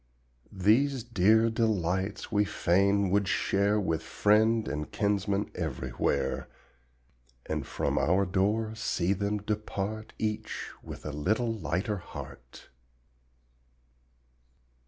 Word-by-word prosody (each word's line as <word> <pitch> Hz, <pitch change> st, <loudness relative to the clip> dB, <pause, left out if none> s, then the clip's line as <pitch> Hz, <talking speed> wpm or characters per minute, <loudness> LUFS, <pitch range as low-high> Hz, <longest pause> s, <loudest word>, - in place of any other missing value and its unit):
These 115 Hz, +7 st, +2 dB
dear 110 Hz, 0 st, +3 dB
delights 100 Hz, -4 st, -1 dB
we 105 Hz, -1 st, +3 dB
fain 100 Hz, 0 st, +2 dB
would 100 Hz, 0 st, +2 dB
share 100 Hz, +2 st, +2 dB
With 80 Hz, -5 st, -1 dB
friend 110 Hz, +2 st, +2 dB
and 75 Hz, +1 st, -4 dB
kinsman 100 Hz, -1 st, 0 dB
everywhere, 65 Hz, -7 st, -2 dB, 1.0 s
And -, -, -3 dB
from -, -, -1 dB
our 95 Hz, +3 st, +3 dB
door 105 Hz, +4 st, 0 dB
see 95 Hz, -4 st, 0 dB
them 100 Hz, +2 st, -1 dB
depart 105 Hz, 0 st, -4 dB
Each 110 Hz, 0 st, -3 dB
with -, -, -9 dB
a 75 Hz, -, -3 dB
little 110 Hz, +11 st, 0 dB
lighter 100 Hz, +1 st, -2 dB
heart. -, -, -10 dB
100 Hz, 100 wpm, -29 LUFS, 95-110 Hz, 1.0 s, dear